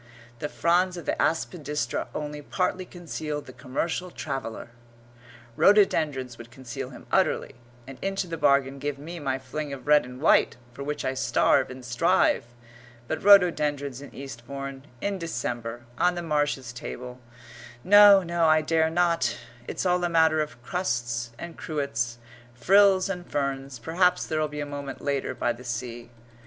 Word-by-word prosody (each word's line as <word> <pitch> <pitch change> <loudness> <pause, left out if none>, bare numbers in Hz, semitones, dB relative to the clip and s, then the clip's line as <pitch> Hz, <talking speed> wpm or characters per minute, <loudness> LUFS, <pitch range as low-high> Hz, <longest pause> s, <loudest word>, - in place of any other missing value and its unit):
"The 150 - -3
fronds 180 +2 +2
of 170 - -8
the - - 0
aspidistra 150 -5 -1
only 150 0 -4
partly 185 +4 -1
concealed 155 -4 -5
the 130 - -11
commercial 140 +8 -3
traveller 135 -7 -5 0.4
" 120 -1 -22
Rhododendrons 150 - +3
would 120 0 -10
conceal 130 +1 -7
him 130 - -12
utterly, - - +1 0.3
and 135 0 -11
into 195 0 -1
the 170 -2 -5
bargain 140 -3 +2
give 145 0 -3
me 165 +5 -8
my 135 -3 -1
fling 140 +3 -5
of 135 -1 -7
red 150 0 +5
and 125 +1 -10
white, 155 - +4 0.2
for 140 - -7
which 145 0 -3
I 130 - 0
starve 130 +1 +2
and 130 -1 -9
strive; 135 +2 +2 0.6
but 160 - -3
rhododendrons 150 -9 +4
in 145 - -10
Eastbourne 135 +2 -7
in 200 -1 -2
December 120 -7 -4 0.2
on 180 0 +3
the 175 - -4
Marshes' 145 -6 -1
table 125 0 -7 0.6
no, 205 0 +8
no, 170 -1 +1
I 155 0 +4
dare 160 0 +2
not; 165 -7 +1 0.3
it's - - -3
all 180 -1 +2
a 175 - +1
matter 160 -2 +4
of 150 -5 -6
crusts 120 -8 -2
and 170 -1 -8
cruets, 120 -6 -2 0.4
frills 190 - +5
and 180 -2 -5
ferns. 135 -2 -2
Perhaps 170 +9 +1
there'll 155 -1 0
be 150 0 -6
a - - -2
moment 140 -1 -6
later 140 -1 -2
by 120 - 0
the 120 +2 -12
sea. 120 -1 -5
145 Hz, 160 wpm, -26 LUFS, 130-170 Hz, 0.6 s, no